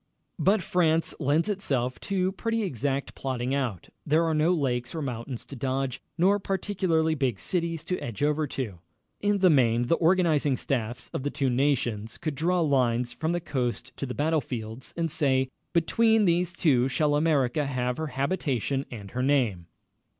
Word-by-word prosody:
But 195 -1 +3
France 165 -2 +2
lends 150 +4 +2
itself 135 - -1
to 190 -1 0
pretty 225 +3 -1
exact 140 - -2
plotting 130 -1 -2
out. 125 -10 -2
There 155 +2 +3
are 165 - +1
no 155 +3 +3
lakes 130 -5 -1
or 160 - -2
mountains 125 -1 -5
to 140 - -9
dodge, 130 0 -2 0.2
nor 195 +4 +4
particularly 185 -5 0
big 135 -8 0
cities 165 -3 -2
to 180 +2 -2
edge 115 +3 -4
over 150 +1 +1
to. 115 -10 -5 0.4
In 205 0 +2
the 185 -2 +5
main, 120 -4 +3
the 120 - +1
organizing 160 -6 +3
staffs 120 -2 -3
of - - -2
the 145 - -1
two 140 -3 0
nations 120 -5 0
could 155 - -3
draw 170 +5 +1
lines 125 -5 +1
from 160 +6 -2
the 175 - 0
coast 130 -5 -3
to 140 - -3
the 125 - -5
battle 155 +1 +1
fields, 115 0 -6
and 165 -2 0
say: 130 -4 +2 0.2
"Between 220 +6 +3
these 175 0 +2
two 135 -8 +2
shall 145 +2 +1
America 145 -2 +2
have 125 -2 -1
her 160 - -2
habitation 135 - -1
and 100 -5 -8
her 125 - -2
name." 120 -11 +1
145 Hz, 170 wpm, -27 LUFS, 125-165 Hz, 0.4 s, the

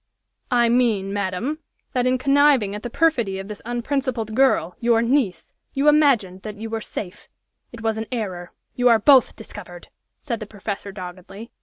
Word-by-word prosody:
"I 240 -2 +3
mean, 225 -5 +1
madam, 205 +10 -2 0.3
that 250 -1 +1
in 255 0 +2
conniving 275 -5 +3
at 210 - -5
the 240 - -5
perfidy 235 -10 +1
of 195 0 -6
this 210 -1 -8
unprincipled 240 -2 -2
girl, 230 -9 +2
your 235 -1 +3
niece, 230 - 0 0.2
you 275 +2 +1
imagined 265 -12 +3
that 210 0 -7
you 220 +1 -7
were 225 0 -2
safe. 200 -2 -7 0.4
It 235 - -10
was 225 -1 -1
an 220 - -5
error. 185 -7 -4 0.2
You 245 0 +3
are 230 - +6
both 260 +3 +5
discovered!" 180 -5 -11 0.3
said 235 -6 -4
the 215 - -7
professor, 205 -1 -6
doggedly. 190 +3 -9
225 Hz, 170 wpm, -22 LUFS, 200-255 Hz, 0.4 s, are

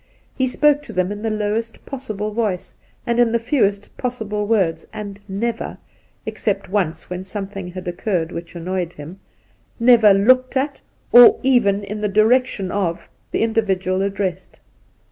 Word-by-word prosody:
He 260 - 0
spoke 295 +3 +3
to - - -10
them 185 +1 0
in 205 0 -6
the 225 - -1
lowest 215 +2 -3
possible 215 -6 -5
voice 210 -5 -2 0.3
and 235 -1 0
in 240 -2 +4
the 235 - +3
fewest 225 -5 0
possible 215 -5 -3
words, 180 -7 +1
and 205 -1 -7
never 225 +5 -3 0.2
— - - -39
except - - -2
once, 175 -5 -1
when 180 +1 -5
something 195 -1 -6
had 180 +1 -8
occurred 175 -1 -2
which 170 +1 -8
annoyed 180 0 -3
him 160 +6 -10 0.3
— - - -36 0.2
^never 220 -5 +6
looked 255 +2 +4
at, 275 +1 -2 0.3
or 245 0 +9
even 215 -6 +3
in 210 +1 -5
the 210 - +1
direction 215 -1 +2
of, 175 -4 -2 0.2
the - - 0
individual 195 -4 0
addressed. 195 -2 -3
205 Hz, 160 wpm, -20 LUFS, 185-230 Hz, 0.3 s, or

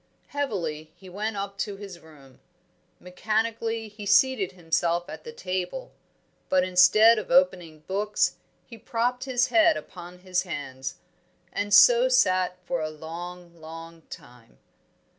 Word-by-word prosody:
Heavily 170 - -4
he 185 +1 -14
went 210 +3 -4
up 200 0 -5
to 205 -2 -3
his 195 -3 -10
room. 140 -5 -18 0.6
Mechanically 225 +4 -2
he 210 -1 -10
seated 200 -3 +3
himself 170 0 -1
at - - -9
the 470 - -8
table. 185 - -5 0.6
But, 185 -1 +3
instead 215 +5 +5
of 215 - -8
opening 180 - +2
books, 205 +5 -1 0.3
he 230 -2 -13
propped 245 +4 -2
his 255 -1 +1
head 330 -1 +4
upon 180 0 -10
his 185 -1 -1
hands, 135 -6 -6 0.6
and 205 0 -3
so - - +7
sat 185 - +2
for 170 -1 -2
a 155 - -2
long, 170 +2 -9
long 165 +1 -10
time. 120 -2 -14
185 Hz, 135 wpm, -26 LUFS, 170-225 Hz, 0.6 s, so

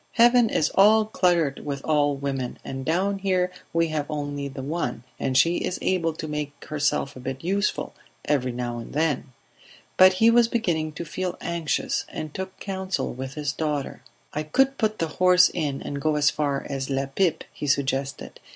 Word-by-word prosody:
Heaven 240 -1 +5
is 155 - +1
all 215 +2 +6
cluttered 175 -8 +1
with 140 -1 -3
old 145 -2 +2
women, 135 -3 -2
and 135 0 -5
down 190 +6 0
here 185 -2 +1 0.2
we 165 0 +1
have 150 -2 -2
only 145 -2 -3
the 135 -1 -7
one, 135 -5 -3 0.2
and 130 -1 0
she 170 +5 +4
is 180 - -2
able 170 -3 0
to 155 0 -6
make 150 -1 -5
herself 145 -2 -1
a - - -9
bit 130 +2 -5
useful, 200 +4 -1 0.3
every 130 -4 +1
now 120 -1 -4
and 115 - -9
then 150 -1 +1 0.4
..." - - -25
But 185 0 +8
he 225 +5 +5
was 235 0 +5
beginning 170 -10 -1
to 170 - -6
feel 180 +3 -3
anxious, 170 -2 -1
and 155 -1 -6
took 190 0 -6
counsel 190 -1 -3
with 130 +3 -6
his 145 -2 -2
daughter. 150 -5 -3 0.3
"I 150 - -1
could 270 - +1
put 215 -1 +1
the 165 - -1
horse 180 0 +6
in 145 -5 -2
and 140 0 -5
go 155 0 +1
as 150 0 +3
far 140 -2 -1
as 135 -1 -4
La 135 0 0
Pipe," 160 +5 0
he 145 - -5
suggested. 135 0 -1
155 Hz, 190 wpm, -25 LUFS, 140-185 Hz, 0.4 s, But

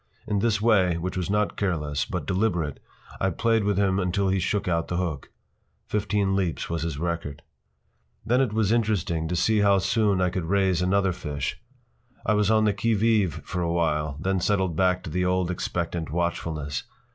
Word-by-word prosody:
In 105 -2 0
this 110 0 +1
way, 95 -6 +3
which 90 +2 -4
was 90 -1 -2
not 105 0 +1
careless, 75 -7 -1
but - - -4
deliberate, 90 -7 0 0.4
I 95 - +2
played 115 +4 +1
with 100 -1 +1
him 100 -1 +2
until 95 +1 0
he 95 0 +1
shook 100 +2 -1
out 85 -2 0
the 85 - -2
hook. 85 -6 -3 0.6
Fifteen 100 -2 0
leaps 90 -5 -1
was 85 -2 -1
his 80 -3 -3
record. 80 -3 -4 0.8
Then 125 +4 +3
it 130 -6 +1
was 110 -1 +1
interesting 100 -8 0
to 90 - -2
see 110 +5 +2
how 100 -1 +4
soon 100 0 +2
I 90 -1 +2
could 90 -3 -3
raise 95 -1 +2
another 95 +1 +2
fish. 75 -5 -4 0.6
I 105 - +3
was 105 -1 +2
on 110 -1 +4
the 105 -1 +3
qui 110 +3 +1
vive 105 -5 +2
for 90 - -3
a 85 -1 0
while, 75 -4 0
then 95 +3 0
settled 95 -2 +1
back 90 +1 +2
to 80 - -6
the 90 +2 0
old 90 -1 +1
expectant 85 -2 -3
watchfulness. 80 -3 -2
95 Hz, 190 wpm, -25 LUFS, 85-105 Hz, 0.8 s, how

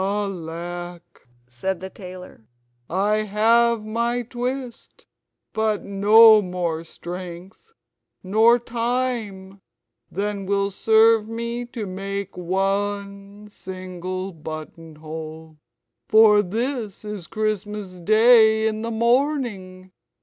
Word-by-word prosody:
"Alack," 175 -5 -5 0.2
said 175 +10 -3
the 190 +1 -8
tailor, 180 - -11 0.4
"I 200 +5 +1
have 220 +2 +2
my 235 +2 -1
twist; 250 +1 -6 0.5
but 220 -1 0
no 215 +2 +7
more 175 -3 -3
strength 180 - -9 0.5
nor 220 +5 +4
time 230 -5 -3 0.5
than 200 0 -3
will 200 0 0
serve 220 +1 +4
to 235 0 -5
make 195 +1 -5
me 180 - -7
one 200 +2 -2
single 185 0 -6
buttonhole; 155 0 -9 0.5
for 215 -1 +6
this 220 +1 -4
is 210 -5 -6
Christmas 210 -3 -3
Day 220 +3 +5
in 215 0 -2
the 230 - -3
Morning! 230 -6 -1
200 Hz, 90 wpm, -23 LUFS, 185-225 Hz, 0.5 s, no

